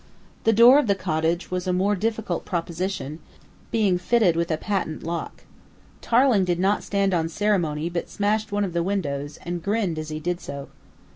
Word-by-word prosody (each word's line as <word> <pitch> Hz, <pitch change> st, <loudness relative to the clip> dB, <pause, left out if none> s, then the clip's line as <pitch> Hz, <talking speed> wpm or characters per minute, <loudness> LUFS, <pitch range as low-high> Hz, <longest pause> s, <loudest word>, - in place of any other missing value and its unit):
The 225 Hz, -, +5 dB
door 235 Hz, +5 st, +8 dB
of 295 Hz, -, 0 dB
the 200 Hz, -, +3 dB
cottage 165 Hz, 0 st, -1 dB
was 180 Hz, 0 st, -2 dB
a -, -, +2 dB
more 195 Hz, +3 st, +2 dB
difficult 215 Hz, -3 st, -2 dB
proposition, 170 Hz, -3 st, -3 dB, 0.5 s
being 200 Hz, -5 st, +2 dB
fitted 200 Hz, -3 st, +3 dB
with 170 Hz, 0 st, 0 dB
a 155 Hz, -, 0 dB
patent 185 Hz, -5 st, -3 dB
lock. 170 Hz, +1 st, -5 dB, 0.6 s
Tarling 240 Hz, -4 st, +4 dB
did 175 Hz, -1 st, 0 dB
not 195 Hz, +3 st, +2 dB
stand 200 Hz, -1 st, 0 dB
on 165 Hz, -2 st, +1 dB
ceremony, 170 Hz, -5 st, 0 dB
but 170 Hz, 0 st, -4 dB
smashed 210 Hz, +1 st, 0 dB
one 205 Hz, 0 st, 0 dB
of 180 Hz, -, -5 dB
the 170 Hz, -, +1 dB
windows, 145 Hz, -7 st, -2 dB
and 175 Hz, 0 st, -3 dB
grinned 200 Hz, -4 st, -1 dB
as 155 Hz, 0 st, -5 dB
he 155 Hz, 0 st, -4 dB
did 175 Hz, +3 st, -2 dB
so. 140 Hz, 0 st, -7 dB
180 Hz, 185 wpm, -24 LUFS, 165-205 Hz, 0.6 s, door